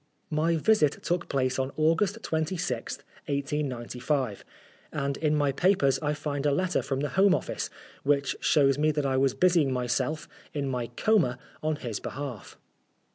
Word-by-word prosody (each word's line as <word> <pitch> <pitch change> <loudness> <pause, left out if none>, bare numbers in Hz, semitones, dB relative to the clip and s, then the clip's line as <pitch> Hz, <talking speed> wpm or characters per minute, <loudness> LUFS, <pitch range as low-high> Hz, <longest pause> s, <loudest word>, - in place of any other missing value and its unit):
My 160 +2 +2
visit 160 -3 +2
took 175 0 -1
place 130 -1 0
on 130 +1 -1
August 165 +7 +2
26th, 160 -6 -2 0.2
1895, 135 -4 -2 0.5
and 140 0 -1
in 155 -1 +1
my 145 -2 +2
papers 140 -4 +3
I 150 -1 0
find 145 -2 -3
a - - +3
letter 185 +5 +1
from 135 0 -2
the 145 - -1
Home 190 +5 +4
Office, - - -3 0.3
which 140 0 +1
shows 140 -2 +3
me 155 +1 +3
that 145 -1 -1
I 135 -1 +1
was 135 -1 +2
busying 170 -6 +3
myself, 130 +4 -1 0.3
in 140 -2 -1
my 125 -3 -2
coma, 145 - +2 0.2
on 155 0 0
his 120 -7 -4
behalf. 135 -7 -6
145 Hz, 155 wpm, -28 LUFS, 130-160 Hz, 0.5 s, Home